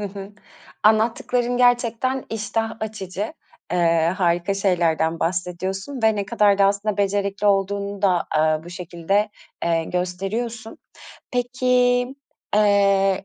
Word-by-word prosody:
Hı -, -, -3 dB
hı, 195 Hz, 0 st, -9 dB, 0.5 s
anlattıkların 235 Hz, +3 st, +2 dB
gerçekten 245 Hz, +1 st, +2 dB
iştah 225 Hz, +1 st, -2 dB
açıcı. 210 Hz, -, -5 dB, 0.4 s
Eee, 170 Hz, -1 st, +2 dB
harika 175 Hz, +2 st, +1 dB
şeylerden 170 Hz, -4 st, +1 dB
bahsediyorsun 185 Hz, +8 st, -3 dB
ve 220 Hz, -1 st, +3 dB
ne 200 Hz, -1 st, -2 dB
kadar 200 Hz, 0 st, +3 dB
da 200 Hz, -, +5 dB
aslında 200 Hz, +1 st, +1 dB
becerikli 200 Hz, 0 st, 0 dB
olduğunu 200 Hz, 0 st, 0 dB
da, 180 Hz, -3 st, +2 dB
aaa, 155 Hz, 0 st, +2 dB
bu 175 Hz, -, -10 dB
şekilde, 180 Hz, +4 st, -1 dB, 0.3 s
eee, 165 Hz, -1 st, +1 dB
gösteriyorsun. 205 Hz, +6 st, -4 dB, 0.5 s
Peki, 245 Hz, 0 st, +2 dB, 0.5 s
eee, 200 Hz, -2 st, +3 dB
200 Hz, 115 wpm, -22 LUFS, 180-220 Hz, 0.5 s, da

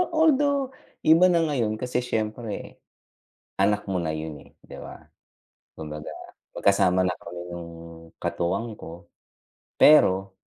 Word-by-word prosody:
although, 285 Hz, -4 st, +3 dB, 0.3 s
iba 165 Hz, +3 st, +6 dB
na 170 Hz, -1 st, +3 dB
ngayon 125 Hz, -9 st, 0 dB
kasi 125 Hz, 0 st, -1 dB
siyempre. 110 Hz, -1 st, -4 dB, 0.8 s
Anak 105 Hz, +1 st, +2 dB
mo 95 Hz, -, 0 dB
na 80 Hz, -, -2 dB
yun 80 Hz, -1 st, -5 dB
eh, -, -, -18 dB
di -, -, -15 dB
ba? -, -, -9 dB, 0.8 s
Kumbaga, 75 Hz, -1 st, -7 dB, 0.5 s
magkasama 95 Hz, -2 st, +3 dB
na -, -, +1 dB
kami 85 Hz, +1 st, -8 dB
nung 85 Hz, -1 st, -7 dB, 0.5 s
katuwang 100 Hz, +7 st, -2 dB
ko. 85 Hz, +1 st, -11 dB, 0.7 s
Pero, 95 Hz, -10 st, +5 dB
105 Hz, 120 wpm, -25 LUFS, -, 0.8 s, iba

